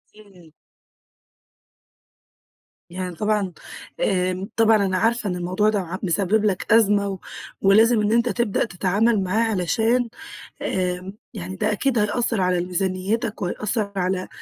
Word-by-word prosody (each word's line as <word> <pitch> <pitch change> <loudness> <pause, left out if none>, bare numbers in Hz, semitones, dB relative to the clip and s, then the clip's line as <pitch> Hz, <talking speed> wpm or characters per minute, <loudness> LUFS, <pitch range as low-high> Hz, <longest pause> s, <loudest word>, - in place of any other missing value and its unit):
إمم. 190 -6 -18 2.4
يعني 180 -1 -5
طبعًا 210 -3 0 0.5
آآ، 185 - 0
طبعًا 220 -2 +4
أنا 185 -1 0
عارفة 225 +1 +1
إن 180 - -2
الموضوع 185 +4 +1
ده 215 -1 0
ع 185 0 -5
مسبب 195 +4 +1
لك 200 +1 +1
أزمة، 205 -3 +4
و 190 - -5 0.4
ولازم 220 +3 +5
إن 210 0 +1
أنت 235 +1 +2
تبدأ 235 -3 0
تتعامل 200 +3 +1
معاه 220 +5 +1
علشان 225 +6 +1 0.5
آآ 185 0 -2 0.2
يعني 95 +2 -6
ده 215 - 0
أكيد 245 +3 0
هيأثر 215 +1 0
على 180 -1 +2
ال 175 - -2
ميزانيتك، 195 +5 -2
وهيأثر 205 +3 -2
على 185 0 -1
200 Hz, 135 wpm, -22 LUFS, 185-220 Hz, 2.4 s, ولازم